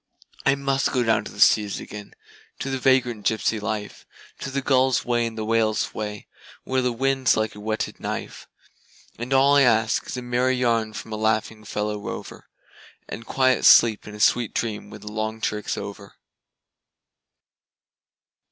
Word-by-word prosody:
I 140 - +5
must 140 0 0
go 125 -2 +1
down 115 -2 +1
to - - -8
the - - -13
seas 105 -2 +4
again, 105 -1 -10 0.4
to 135 - -4
the 135 - -2
vagrant 125 -4 +2
gypsy 110 0 0
life, 105 0 -5 0.3
To - - -5
the 135 0 -3
gull's 130 -2 +2
way 120 -1 +1
and 115 -1 -8
the 110 - -3
whale's 110 -1 +1
way, 105 -1 -5 0.4
where 130 0 0
the 125 -1 0
wind's 135 +2 +1
like 110 0 -1
a 105 - -11
whetted 110 +1 -3
knife; - - -6 0.7
And 120 +2 -5
all 135 +1 +5
I - - +6
ask 110 -3 +2
is - - -5
a 125 - -5
merry 125 +1 +1
yarn 115 -3 0
from 110 +1 -7
a - - -3
laughing 110 0 -1
fellow 105 0 -3
rover, 100 - -8 0.6
And 115 +1 -8
quiet 130 -2 +2
sleep 110 -3 +6
and 105 - -8
a - - -10
sweet 120 +1 +2
dream 110 -3 -3
when 105 - -11
the 105 0 -8
long 110 +1 -3
trick's 105 -1 -2
over. 100 0 -8
115 Hz, 170 wpm, -24 LUFS, 105-130 Hz, 0.7 s, I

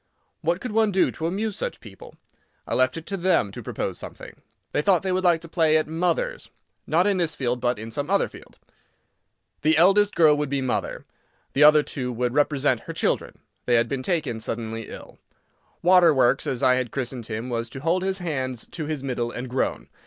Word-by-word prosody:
What 170 +3 0
could 250 - -5
one 220 -1 +2
do 190 -1 +2
to 160 - -3
amuse 205 +4 -2
such - - -4
people? 105 -5 -13 0.5
I - - -4
left 130 +3 +2
it 165 - -7
to 195 - -3
them 175 - +2
to - - -8
propose - - -4
something. - - -10 0.3
They - - +1
thought 180 +2 +3
they 190 - -1
would 185 +1 0
like 170 -3 +3
to 170 - -8
play 160 -2 +3
at 155 - +1
"Mothers"—not 165 0 -2
in 205 -2 +2
this 170 -3 0
field, 125 -2 -2
but 125 0 +1
in 110 +2 -7
some 145 +7 -4
other 200 0 +2
field. - - -15 1.0
The 155 +1 +3
eldest 195 +4 +4
girl 155 -3 +6
would 150 -1 -2
be 140 0 0
mother. 130 -2 -2 0.5
The 140 - +1
other 150 0 +7
two 125 -4 -4
would 125 +1 -1
represent 145 -3 +2
her - - -3
children. - - -1 0.3
They 120 - +4
had 115 0 +3
been 135 0 -3
taken 140 -6 -1
suddenly 115 0 -4
ill. - - -11 0.6
"Waterworks," 160 -8 +4
as 125 - -2
I 130 - +5
had 130 -2 -2
christened 125 -3 -5
him, 115 +3 -4
was 115 0 -2
to 135 - -8
hold 170 +5 +1
his 190 0 0
hands 130 - -3
to 160 - -5
his 150 -3 -4
middle 120 -3 -2
and 125 +2 -6
groan. 125 +1 -2
150 Hz, 205 wpm, -24 LUFS, 125-175 Hz, 1.0 s, other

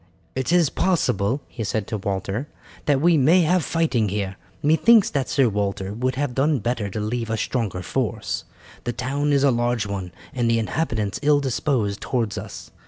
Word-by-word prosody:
"It 130 +3 -2
is 175 -5 +4
possible," 140 - +1
he 115 - -6
said 105 0 -1
to 110 - -3
Walter, 100 +6 -3 0.4
"that 145 -2 +3
we 165 +1 +4
may 165 +7 +5
have 175 +1 +2
fighting 140 -11 +1
here. 100 -1 -2 0.3
Methinks 195 +9 +5
that 140 -3 -1
Sir 135 -3 +3
Walter 100 -2 -2
would 125 +3 -1
have 140 -1 -1
done 140 +3 +2
better 115 -2 -2
to 100 - -4
leave 115 +2 -2
a 115 - 0
stronger 105 -6 -2
force. 110 +4 -2 0.4
The 120 - -1
town 140 +5 -1
is 140 -1 +3
a 140 - +5
large 120 -2 0
one, 95 -3 -4 0.2
and 120 -2 0
the 115 - +3
inhabitants 110 -3 -1
ill 145 0 +4
disposed 125 -6 -1
towards 115 -5 -1
us. - - -9
120 Hz, 180 wpm, -23 LUFS, 105-145 Hz, 0.4 s, may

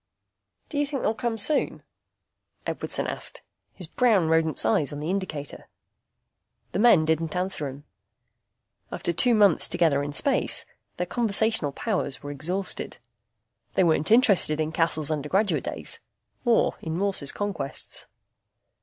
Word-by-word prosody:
"Do 290 - -2
you 290 - +1
think 275 -2 -4
they'll 215 - +2
come 230 0 -2
soon?" 290 +8 -1 0.8
Edwardson - - -2
asked, - - -4 0.3
his 180 - -6
brown 195 -2 +2
rodent's 160 -5 +1
eyes 130 +6 +2
on 145 - -6
the 155 +4 -2
indicator. 160 -7 -5 1.0
The - - -2
men 215 -8 +6
didn't 160 +1 0
answer 180 -5 -2
him. 135 +2 -9 1.1
After 170 - -2
two 240 +7 +4
months 200 -6 +5
together 150 -5 +2
in 145 0 -3
space 270 - +2 0.3
their 180 - -1
conversational 220 - +2
powers 160 - -2
were 145 - -5
exhausted. 180 +7 -3 0.8
They - - +4
weren't 160 -2 +2
interested 205 -9 +4
in 155 0 -1
Cassel's 160 -2 0
undergraduate 155 +8 0
days, - - -4 0.5
or 235 -1 +3
in 160 0 -4
Morse's 195 -7 0
conquests. 185 -10 -5
175 Hz, 135 wpm, -26 LUFS, 155-210 Hz, 1.1 s, men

